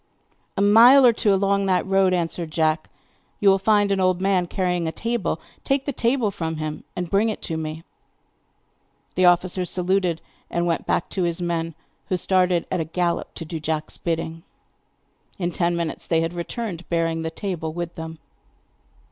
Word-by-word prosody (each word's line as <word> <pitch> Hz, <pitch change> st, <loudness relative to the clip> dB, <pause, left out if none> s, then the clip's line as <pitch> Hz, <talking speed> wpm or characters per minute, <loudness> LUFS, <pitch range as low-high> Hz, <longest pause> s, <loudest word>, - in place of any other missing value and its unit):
'A 200 Hz, -, +2 dB
mile 240 Hz, +6 st, +8 dB
or 240 Hz, -, +7 dB
two 220 Hz, -2 st, +1 dB
along 195 Hz, 0 st, +2 dB
that 185 Hz, -1 st, +2 dB
road,' 195 Hz, -1 st, +3 dB
answered 170 Hz, -2 st, -1 dB
Jack, 155 Hz, 0 st, 0 dB, 0.5 s
'you 205 Hz, -, +2 dB
will 195 Hz, 0 st, +4 dB
find 205 Hz, 0 st, +3 dB
an 195 Hz, -, +1 dB
old 185 Hz, -1 st, +2 dB
man 190 Hz, -2 st, +1 dB
carrying 180 Hz, -2 st, -1 dB
a -, -, -1 dB
table. 230 Hz, -6 st, -2 dB, 0.2 s
Take 275 Hz, 0 st, 0 dB
the 285 Hz, -, -2 dB
table 235 Hz, -3 st, +1 dB
from 160 Hz, -3 st, -3 dB
him 155 Hz, 0 st, -5 dB
and 180 Hz, -, -3 dB
bring 205 Hz, +3 st, +3 dB
it 215 Hz, -, -4 dB
to 165 Hz, -, -3 dB
me.' 160 Hz, 0 st, -5 dB, 1.3 s
The 185 Hz, -, +3 dB
officer 180 Hz, +1 st, +3 dB
saluted 180 Hz, -1 st, 0 dB, 0.3 s
and 170 Hz, 0 st, -1 dB
went 170 Hz, -1 st, -1 dB
back -, -, +1 dB
to 190 Hz, -, -2 dB
his 170 Hz, -1 st, 0 dB
men, 165 Hz, -2 st, -2 dB, 0.3 s
who 185 Hz, -, +1 dB
started 180 Hz, -2 st, +2 dB
at -, -, 0 dB
a -, -, 0 dB
gallop 170 Hz, +2 st, -2 dB
to 165 Hz, -, -6 dB
do 160 Hz, +1 st, -5 dB
Jack's 155 Hz, 0 st, -3 dB
bidding. 165 Hz, -1 st, -3 dB, 1.0 s
In 175 Hz, -2 st, -1 dB
ten 175 Hz, 0 st, 0 dB
minutes 170 Hz, -2 st, -3 dB
they 165 Hz, -1 st, +2 dB
had 165 Hz, +1 st, -2 dB
returned, 180 Hz, 0 st, -5 dB
bearing 165 Hz, -1 st, 0 dB
the 160 Hz, -, -2 dB
table 165 Hz, -2 st, -4 dB
with 170 Hz, +1 st, -5 dB
them. 160 Hz, 0 st, -7 dB
175 Hz, 180 wpm, -23 LUFS, 165-195 Hz, 1.3 s, mile